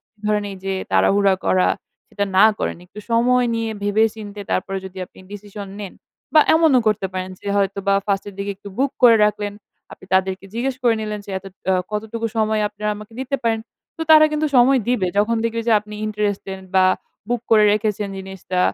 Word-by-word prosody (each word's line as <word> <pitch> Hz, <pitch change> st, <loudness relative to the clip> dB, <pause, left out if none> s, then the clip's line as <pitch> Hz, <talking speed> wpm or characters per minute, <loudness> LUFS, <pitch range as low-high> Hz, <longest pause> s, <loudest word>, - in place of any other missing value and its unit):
আপনি 220 Hz, -, -68 dB
ধরেন 210 Hz, -1 st, +1 dB
এই 195 Hz, -, -7 dB
যে 195 Hz, -, -1 dB, 0.2 s
তাড়াহুড়া 195 Hz, -, +4 dB
করা, 185 Hz, -1 st, +3 dB, 0.4 s
সেটা 200 Hz, 0 st, -2 dB
না 195 Hz, -, +8 dB
করেন। -, -, -2 dB
একটু 210 Hz, +3 st, -11 dB
সময় 245 Hz, +2 st, +3 dB
নিয়ে 225 Hz, -1 st, -2 dB
ভেবে-চিন্তে, 210 Hz, 0 st, 0 dB
তারপরে 195 Hz, +1 st, -1 dB
যদি 190 Hz, 0 st, -9 dB
আপনি -, -, -22 dB
ডিসিশন 205 Hz, -1 st, -8 dB
নেন। 200 Hz, -, -7 dB, 0.4 s
বা 305 Hz, -, +9 dB
এমনও 315 Hz, -6 st, +5 dB
করতে 210 Hz, -2 st, +1 dB
পারেন 185 Hz, 0 st, -4 dB
যে -, -, -13 dB
হয়তোবা 200 Hz, 0 st, +1 dB
ফার্স্ট 195 Hz, -1 st, 0 dB
এর 200 Hz, -, -10 dB
দিকে 200 Hz, 0 st, -3 dB
একটু 200 Hz, 0 st, -11 dB
বুক 275 Hz, 0 st, +2 dB
করে 230 Hz, -2 st, +8 dB
রাখলেন। 210 Hz, -1 st, -1 dB, 0.4 s
আপনি -, -, -13 dB
তাদেরকে 190 Hz, 0 st, 0 dB
জিজ্ঞেস 255 Hz, +2 st, -1 dB
করে 235 Hz, -2 st, +4 dB
নিলেন 215 Hz, -1 st, -4 dB
যে -, -, -8 dB
এত 190 Hz, -, -24 dB, 0.3 s
আ -, -, +3 dB, 0.2 s
কতটুকু 220 Hz, +2 st, -3 dB
সময় 215 Hz, 0 st, +1 dB
আপনারা 210 Hz, 0 st, -3 dB
আমাকে 210 Hz, +2 st, -12 dB
দিতে 265 Hz, +1 st, -1 dB
পারেন? 225 Hz, -1 st, +1 dB, 0.4 s
তো 325 Hz, -, -3 dB
তারা 310 Hz, 0 st, +9 dB
কিন্তু 305 Hz, 0 st, +1 dB
সময় 255 Hz, +2 st, +6 dB
দিবে। 225 Hz, -7 st, +1 dB
যখন 230 Hz, +3 st, +2 dB
দেখবে 230 Hz, 0 st, -1 dB
যে, -, -, +5 dB
আপনি 210 Hz, 0 st, -11 dB
interested 205 Hz, -2 st, -2 dB, 0.2 s
বা 185 Hz, 0 st, +5 dB, 0.4 s
বুক 240 Hz, -1 st, 0 dB
করে 215 Hz, -2 st, +6 dB
রেখেছেন 210 Hz, -1 st, -1 dB
জিনিসটা। 190 Hz, -1 st, -4 dB
210 Hz, 190 wpm, -21 LUFS, 195-230 Hz, 0.4 s, বা